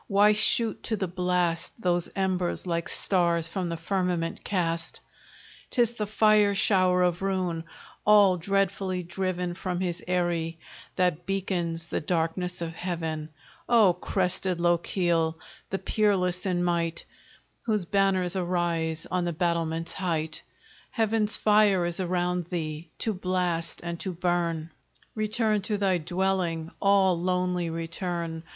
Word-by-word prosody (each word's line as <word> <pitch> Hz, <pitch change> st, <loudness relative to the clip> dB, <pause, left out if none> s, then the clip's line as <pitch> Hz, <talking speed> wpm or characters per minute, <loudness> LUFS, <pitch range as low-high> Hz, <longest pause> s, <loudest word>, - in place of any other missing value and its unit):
Why 205 Hz, +1 st, +5 dB
shoot 215 Hz, +2 st, +2 dB
to 220 Hz, -, 0 dB
the 190 Hz, -1 st, -1 dB
blast 180 Hz, 0 st, -1 dB
Those 175 Hz, -4 st, +1 dB
embers, 185 Hz, -2 st, 0 dB
like 170 Hz, -2 st, -2 dB
stars 170 Hz, -3 st, +1 dB
from 180 Hz, +1 st, -3 dB
the 170 Hz, -, -3 dB
firmament 175 Hz, -1 st, -1 dB
cast? 170 Hz, -4 st, -1 dB, 0.7 s
'Tis 240 Hz, -2 st, +2 dB
the 215 Hz, -3 st, -3 dB
fire 215 Hz, -1 st, +4 dB
shower 185 Hz, -2 st, +3 dB
of 175 Hz, 0 st, +1 dB
ruin, 185 Hz, -4 st, -1 dB, 0.4 s
all 205 Hz, -3 st, +6 dB
dreadfully 195 Hz, 0 st, 0 dB
driven 180 Hz, 0 st, -2 dB
From 180 Hz, 0 st, -3 dB
his 175 Hz, -2 st, -2 dB
eyrie, 170 Hz, -2 st, 0 dB, 0.4 s
that 175 Hz, -1 st, 0 dB
beacons 175 Hz, -4 st, -2 dB
the -, -, -3 dB
darkness 175 Hz, +2 st, -1 dB
of 165 Hz, 0 st, -4 dB
heaven. 160 Hz, -3 st, -4 dB, 0.4 s
O 220 Hz, -6 st, +6 dB
crested 180 Hz, 0 st, -1 dB
Lochiel! 170 Hz, -1 st, +1 dB, 0.3 s
the 195 Hz, -, -1 dB
peerless 190 Hz, -4 st, +1 dB
in 175 Hz, -1 st, +1 dB
might, 170 Hz, -1 st, -1 dB, 0.6 s
Whose 210 Hz, -5 st, +1 dB
banners 195 Hz, -1 st, +1 dB
arise 170 Hz, -3 st, -1 dB
on 180 Hz, -1 st, 0 dB
the 175 Hz, -, -1 dB
battlements' 165 Hz, 0 st, -1 dB
height, 160 Hz, -4 st, -2 dB, 0.5 s
Heaven's 220 Hz, -1 st, +1 dB
fire 210 Hz, -4 st, +4 dB
is 175 Hz, +1 st, -2 dB
around 180 Hz, -1 st, 0 dB
thee, 160 Hz, -2 st, -4 dB
to 220 Hz, -, -1 dB
blast 180 Hz, -3 st, -1 dB
and 170 Hz, -1 st, -4 dB
to 190 Hz, -, -3 dB
burn; 170 Hz, -2 st, -1 dB, 0.4 s
Return 215 Hz, -1 st, 0 dB
to 210 Hz, +1 st, -2 dB
thy 190 Hz, -3 st, +2 dB
dwelling! 175 Hz, -1 st, -1 dB
all 195 Hz, -2 st, +4 dB
lonely 180 Hz, -1 st, 0 dB
return! 165 Hz, 0 st, -4 dB
180 Hz, 130 wpm, -27 LUFS, 170-195 Hz, 0.7 s, all